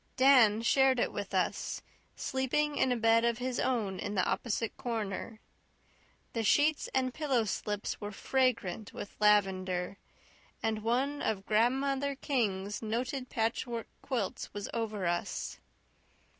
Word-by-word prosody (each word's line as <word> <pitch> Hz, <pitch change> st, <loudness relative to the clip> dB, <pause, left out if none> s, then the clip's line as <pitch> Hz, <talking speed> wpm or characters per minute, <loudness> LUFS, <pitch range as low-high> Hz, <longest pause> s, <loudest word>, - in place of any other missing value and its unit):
Dan 245 Hz, -5 st, +6 dB
shared 265 Hz, +1 st, +4 dB
it -, -, 0 dB
with -, -, -4 dB
us, -, -, -1 dB, 0.3 s
sleeping 290 Hz, +3 st, 0 dB
in 260 Hz, -, +2 dB
a 245 Hz, -, +2 dB
bed 225 Hz, 0 st, +4 dB
of 235 Hz, -1 st, +2 dB
his 250 Hz, 0 st, -2 dB
own 215 Hz, -7 st, 0 dB
in 205 Hz, 0 st, -3 dB
the 185 Hz, -, +2 dB
opposite 230 Hz, -1 st, -1 dB
corner. 220 Hz, -2 st, -4 dB, 0.9 s
The 230 Hz, -, -1 dB
sheets 295 Hz, +7 st, +3 dB
and 255 Hz, -1 st, +1 dB
pillow 270 Hz, -6 st, +1 dB
slips 205 Hz, 0 st, -3 dB
were 205 Hz, 0 st, -4 dB
fragrant 225 Hz, -4 st, 0 dB
with 200 Hz, -, -7 dB
lavender, 190 Hz, -3 st, +2 dB, 0.7 s
and 220 Hz, -1 st, 0 dB
one 260 Hz, +6 st, 0 dB
of 195 Hz, -3 st, -1 dB
Grandmother 270 Hz, +5 st, +1 dB
King's 205 Hz, -8 st, -1 dB
noted 250 Hz, +4 st, -2 dB
patchwork 230 Hz, +1 st, -1 dB, 0.2 s
quilts 235 Hz, -9 st, -3 dB
was 205 Hz, -, -4 dB
over 215 Hz, -4 st, -2 dB
us. 175 Hz, 0 st, -2 dB
230 Hz, 130 wpm, -31 LUFS, 210-260 Hz, 0.9 s, Dan